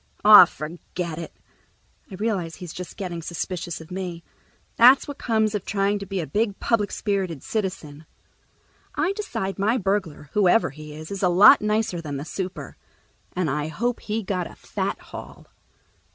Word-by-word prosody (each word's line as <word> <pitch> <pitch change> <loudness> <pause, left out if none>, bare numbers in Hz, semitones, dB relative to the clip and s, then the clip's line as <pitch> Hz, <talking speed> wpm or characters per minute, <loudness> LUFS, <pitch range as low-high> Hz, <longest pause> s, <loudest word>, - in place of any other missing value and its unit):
"Aw, 210 -3 +11
forget 170 +1 -6
it." 165 - -7 0.8
I 195 - -8
realize 190 -5 -2
he's 180 -3 -9
just 180 -1 -8
getting 175 -4 -4
suspicious 170 0 -4
of 160 +2 -13
me. 180 -2 -5 0.5
That's 250 +3 +7
what 285 -1 -7
comes 220 -2 +1
of 205 -3 -2
trying 200 0 0
to 200 - -7
be 195 0 -3
a 165 - -2
big 205 - -1
public 215 -3 +1
spirited 190 - -2
citizen. 165 -8 -4 0.9
I 330 +6 +1
decide 205 - -4
my 220 +5 +2
burglar, 190 - -2
whoever 205 - +3
he 150 +1 -10
is, 155 +3 -9
is 200 - -4
a 185 - +3
lot 180 +4 +8
nicer 210 -4 0
than 145 -3 -5
the 140 - -6
super, 185 +2 -6 0.6
and 180 -2 -1
I 150 +2 -1
hope 235 +9 -2
he 220 +1 -3
got 185 -2 -2
a - - -14
fat - - -3
haul. - - -11
190 Hz, 165 wpm, -24 LUFS, 170-210 Hz, 0.9 s, Aw